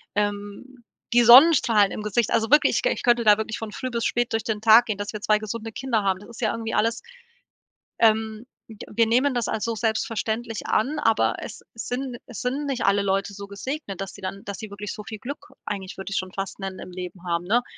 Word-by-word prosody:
Ähm, 205 +5 -3 0.3
die 240 0 +6
Sonnenstrahlen 240 -5 +7
im - - -5
Gesicht, 210 +1 0
also 225 0 +1
wirklich, 295 +1 +5
ich - - +1
k - - +1
ich - - -4
könnte 240 -1 +3
da 210 0 +7
wirklich 220 0 -3
von 220 -2 -6
früh 255 +4 -4
bis 235 -1 -2
spät 240 0 0
durch 225 - 0
den 215 -2 -2
Tag 225 +2 +7
gehen, 215 -4 -3
dass 205 0 -4
wir 210 - -4
2 215 0 +3
gesunde 220 +1 -5
Kinder 235 -5 -1
haben. 190 -1 +1
Das 205 - -14
ist 235 - -11
ja 220 - +1
irgendwie 225 -1 -4
alles 230 +2 +1 1.0
ähm, 220 0 +2 0.2
w 220 - -12 0.2
wir 230 +1 +4
nehmen 255 +4 +3
das 240 -2 -1
als 220 0 -2
so 230 - -2
selbstverständlich 225 0 -2
an, 270 +8 +1
aber - - +2
es - - -8
es 225 - -7
sind 250 0 -3
es 245 - -9
sind 270 +4 -2
nicht 270 -3 -2
alle 200 +1 +3
Leute 195 +1 -1
so 200 0 -8
gesegnet, 200 - -6
dass 195 -1 -5
sie 200 - -13
dann 195 +1 -6
dass 200 -1 -6
sie 220 - -7
wirklich 200 0 -6
so 210 - -8
viel 215 0 -8
Glück, 280 +6 -7 0.2
eigentlich 195 -2 -5
würde 190 +1 -6
ich - - -1
schon 185 -1 -3
fast 195 +1 -5
nennen, 190 -1 -5
im - - -9
Leben 180 0 -8
haben, 170 0 0
ne? 235 +6 +2
220 Hz, 240 wpm, -24 LUFS, 200-240 Hz, 1.0 s, Sonnenstrahlen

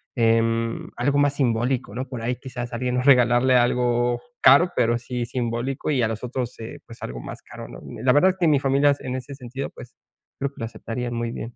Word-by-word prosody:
em, 115 0 +1
algo 140 +4 +1
más 145 0 +2
simbólico, 120 -3 0
¿no? 130 +1 -3
Por 125 -4 -6
ahí, 125 +2 -1
quizás, 125 -2 -7
a - - -2
alguien, 125 0 -1
no 125 - +1
regalarle 125 -1 +5
algo 120 0 +2 0.2
caro, 155 +7 +6
pero 120 0 +2
sí 125 0 -4
simbólico. 120 +4 -3
Y 130 -4 +1
a - - +3
los 110 -1 -4
otros, 125 -1 -4
eh, 110 - -8
pues 115 - -13
algo - - -5
más - - -8
caro, - - -10
¿no? - - -10
Ni 115 0 -9
la 130 - +5
verdad 185 +6 +5
es 185 - -12
que 170 - +3
mi 145 -2 +4
familias, 140 +1 +3
en 130 0 -4
ese 135 +2 -6
sentido, 130 +1 -6
pues - - -13 0.4
creo 140 - -1
que - - -31
lo 115 - -2
aceptarían 120 +1 -5
muy 115 0 -2
bien. 120 0 -7
125 Hz, 230 wpm, -23 LUFS, 115-135 Hz, 0.4 s, caro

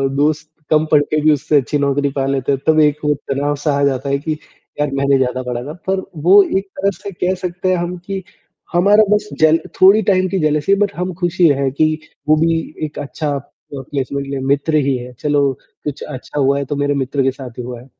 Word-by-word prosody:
दोस्त 150 +1 0 0.2
कम 155 0 +3
पढ़ते 150 0 +3
भी 155 - +2
हुए 155 - +7
उससे 150 +1 +1
अच्छी 140 +3 -2
नौकरी 140 0 +1
पा 135 -1 -1
लेते 135 0 0
हैं। 135 - 0
तब 155 0 +5
एक 150 -1 +4
वो 150 - +3 0.2
तनाव-सा 145 +2 0
आ - - +1
जाता 135 0 0
है 140 - +2
कि 155 +2 -4 0.5
यार 150 -1 +1
मैंने 140 0 +2
ज़्यादा 130 0 -1
पढ़ा 125 -1 -3
था। 150 +4 -7
पर 190 0 +1 0.2
वो 195 +4 +8 0.2
एक 195 - -2
तरह 195 +1 +1
से 200 +3 -8
कह 180 0 -1
सकते 185 0 -2
हैं - - +3
हम 175 +1 -3
कि 195 -1 -4 0.5
हमारा 205 +5 +5
बस 210 0 0
जल 160 +1 +5 0.2
थोड़ी 200 +4 +7
टाइम 185 -2 +2
की 195 - -1
जेलसी 155 +4 +2
बट 200 0 0
हम 180 +1 -3
खुशी 175 -1 +3
है 135 - +1
कि 155 +3 +2 0.4
वो 155 - +7
भी 165 +1 +2 0.3
एक 150 - -7
अच्छा 145 +1 -4
अ, 140 - -3 0.5
प्लेसमेंट 140 0 -3
ले 140 0 -3
मित्र 145 +3 -1
ही 135 - +2
है। 125 0 -9
चलो 145 -2 +2 0.3
कुछ 145 -2 -5
अच्छा 145 0 -6
हुआ 140 0 +3
है 140 - -2
तो 145 - -3
मेरे 145 0 0
मित्र 135 +1 -1
के 135 - +2
साथ 125 -2 -10
ही - - -3
हुआ 120 -1 -7
है। - - -15
150 Hz, 230 wpm, -18 LUFS, 140-175 Hz, 0.5 s, वो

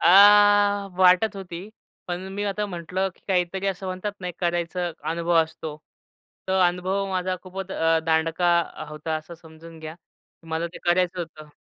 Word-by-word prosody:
अ, - - +2 0.9
वाटत 190 +3 +5
होती, 185 0 -7 0.4
पण 180 +2 -4
मी 205 +1 -3
आता 205 +1 -1
म्हंटलं 185 +1 -2
की - - -28
काहीतरी 185 +1 0
असं 195 0 -2
म्हणतात 185 +3 -3
ना, 180 - -4
एक 175 - -7
करायचा 175 0 -1 0.2
अनुभव 170 +1 0
असतो. 160 -1 -7 0.7
तो 190 0 +2
अनुभव 185 +3 -1
माझा 185 0 -1
खूपच 190 +1 -7
अ, 165 0 +2
दांडका 165 +2 +2
अ, 155 - -7
होता 150 +1 -4
असं 155 +2 -9
समजून 165 0 -14
घ्या. 155 0 -7 0.5
मला 160 +1 -1
ते - - -9
करायचं 180 0 +2
होतं. 155 -2 -8
175 Hz, 160 wpm, -24 LUFS, 165-190 Hz, 0.9 s, वाटत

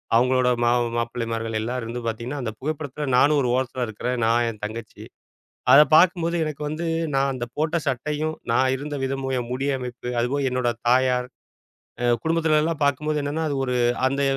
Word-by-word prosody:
அவங்களோட, 125 +1 +3
ம - - +3 0.3
மாப்பிள்ளைமார்கள் 115 -1 -3
எல்லா 120 +3 -3
இருந்து 115 +2 -5
பாத்தீங்கன்னா 120 +5 -4
அந்தப் 110 -3 -5
புகைப்படத்துல 145 0 -4
நானும் 145 +2 +4
ஒரு 125 - 0
ஓரத்துல 130 -1 -1
இருக்குற. 110 +3 -4 0.2
நான் 120 +1 +3
என் 105 -2 -9
தங்கச்சி. 110 0 -8 0.7
அத 145 - +10
பாக்கும் 175 0 +5
போது 170 +1 -1
எனக்கு 150 -1 -5
வந்து 155 +3 -4 0.3
நான் 135 0 +2
அந்த 120 -2 -4
போட்ட 155 +2 +1
சட்டையும், 150 +4 -1 0.2
நான் 130 +2 +3
இருந்த 145 +2 -5
விதமும், 135 0 -2
என் 120 0 -5
முடி 135 +2 -2
அமைப்பு, 125 -1 -7
அதுவும் 135 +3 0
என்னோட 125 -1 0 0.2
தாயார். 125 0 +3 0.8
ஆ. - - +2 0.2
குடும்பத்துலலாம் 160 -1 +1
பார்க்கும் 145 +2 0
போது 150 - +1
என்னன்னா 150 +3 -2
அது 140 - -2
ஒரு 125 - -1 0.3
அந்த 140 +1 -1
130 Hz, 170 wpm, -23 LUFS, 120-150 Hz, 0.8 s, அத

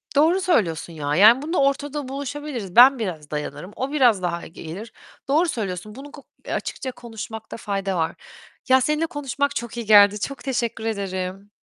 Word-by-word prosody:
Doğru 330 +6 +4
söylüyorsun 175 - 0
ya. 145 -1 -2
Yani 220 +7 +7
bunda 325 +5 -2
ortada 280 0 -1
buluşabiliriz. 275 -7 -5
Ben 255 +2 +8
biraz 160 -9 -5
dayanırım, 150 +4 -5
o 265 +2 -3
biraz 245 -10 +4
daha 170 -1 -3
gelir. 180 +7 -9 0.3
Doğru 315 +6 +2
söylüyorsun. 210 - -4
Bunu 285 +2 -10
ku 280 - -13 0.3
açıkça 260 - -3
konuşmakta 225 -2 -8
fayda 195 -3 -2
var. 160 -1 -1 0.5
Ya, 260 0 +6
seninle 300 +4 +1
konuşmak 285 -1 -2
çok 235 0 -5
iyi 235 - -4
geldi. 205 -1 +6
Çok 275 +6 -5
teşekkür 235 -4 -2
ederim. 195 -2 -4
230 Hz, 160 wpm, -23 LUFS, 190-275 Hz, 0.5 s, Ben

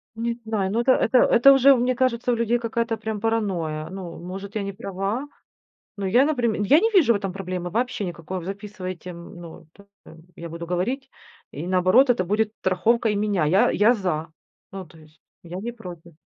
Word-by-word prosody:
Не 235 +1 -2
знаю, 200 -4 -1
но 235 - +1
это 260 - +3
это 250 0 +3
это 275 +4 +6
уже, 270 +1 +6
у 265 - +5
мне 250 +1 0
кажется, 250 -1 0
у - - +1
людей 235 +1 +1
какая-то, 230 0 -2
прям, 220 -1 -5
паранойя. 180 -9 -1
Ну, 185 -3 -8
может 195 +4 -8
я 205 - -1
не 200 0 -5
права, 195 +7 -4 0.7
но 200 -1 -3
я, 245 +8 +4
наприм 245 -7 0
я 275 +10 +5
не 450 +5 +2
вижу 315 - +5
в - - +1
этом 195 -2 -4
проблемы, 180 -2 -5
вообще, 240 -1 -2
никакой. 175 +1 -5
В 170 - -8
записывайте, 190 -2 -7
м, 170 +2 -11
ну, 165 -1 -12
это, 200 - -18 0.2
э, - - -13 0.2
я 170 0 -7
буду 170 +1 -7
говорить 245 +10 -2 0.4
и 155 +5 -7
наоборот, 185 +9 +4
это 230 -6 +2
будет 210 +3 0
страховкой 210 +4 +1
меня. 205 -6 0
Я 185 +7 +3
я- 225 +4 +4
за, 170 -7 -2 0.4
ну, 190 -2 -8
то 165 - -19
есть, 155 0 -20 0.2
я- 175 +2 -7
не 235 +3 -5
против. 175 -7 -11
200 Hz, 205 wpm, -23 LUFS, 180-235 Hz, 0.7 s, это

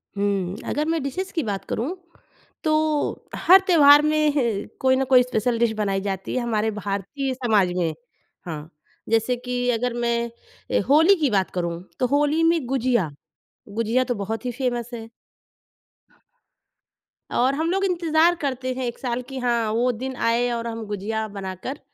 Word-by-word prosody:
हुँ। 195 -2 -1
अगर 300 +2 0
मैं 325 -1 0
डिशेज़ 370 +8 -4
की 325 - -1
बात 200 -4 -3
करूँ 275 +11 -2 0.7
तो 310 - +1 0.7
हर 375 +3 +7
त्योहार 295 -5 +7
में 305 0 +2
ह 230 -6 0
कोई 260 0 +4
ना 265 - +1
कोई 255 -2 +7
स्पेशल 245 -1 -1
डिश 235 -1 +3
बनाई 195 -2 0
जाती 195 -1 -4
है 255 - +1
हमारे 220 -2 0
भारतीय 210 +7 -3
समाज 220 -8 +2
में, 165 -3 0 0.5
हाँ। 155 -2 -6 0.4
जैसे 225 +2 +2
कि 245 0 -1
अगर 245 +1 -1
मैं 235 0 -2
होली 325 +7 +6
की 290 - +3
बात 195 -2 +1
करूँ 170 -1 -3 0.2
तो 255 - +2
होली 295 +4 +2
में 330 -4 +2
गुजिया। 245 - +1 0.6
गुजिया 230 +4 +1
तो 245 - -1
बहुत 220 +3 -4
ही 250 - -1
फ़ेमस 240 -2 -2
है। 225 -1 -7 2.3
और 260 +3 +2
हम 320 +3 -1
लोग 390 +1 +1
इंतज़ार 340 -2 +3
करते 260 -2 -2
हैं 255 0 -3
1 240 -1 -5
साल 245 -1 -2
कि 270 -1 -5
हाँ, 235 -3 0
वो 240 +3 +2
दिन 260 +3 -5
आए 235 +1 +1
और 235 0 -3
हम 225 -1 -5
गुजिया 215 +2 -3
बनाकर 200 +6 -6
240 Hz, 165 wpm, -23 LUFS, 215-275 Hz, 2.3 s, हर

